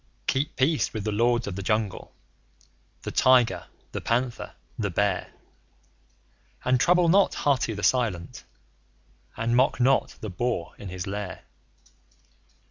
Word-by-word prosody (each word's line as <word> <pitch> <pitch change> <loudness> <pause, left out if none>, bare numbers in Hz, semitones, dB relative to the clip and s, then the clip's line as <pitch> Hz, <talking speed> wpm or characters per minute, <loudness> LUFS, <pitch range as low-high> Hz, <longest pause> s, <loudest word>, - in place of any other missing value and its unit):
Keep 140 +2 -1
peace 145 +4 +1
with 110 - -3
the 110 - -1
Lords 120 +3 +2
of 100 - -5
the 100 - -4
Jungle 110 0 -1 0.9
the - - -4
Tiger, 130 -2 +3 0.2
the - - -4
Panther, 120 +1 -1 0.2
the 105 -4 -2
Bear; 95 +1 0 1.3
And 125 0 +3
trouble 180 +4 +4
not 195 +4 +4
Hathi 130 -6 +1
the 105 - -6
Silent, 105 -10 0 0.9
and 115 +1 0
mock 130 +2 +3
not 130 +2 +2
the 110 - -5
Boar 120 -2 -2
in 100 - -7
his 90 -1 -5
lair. 100 -1 -5
115 Hz, 130 wpm, -26 LUFS, 100-130 Hz, 1.3 s, trouble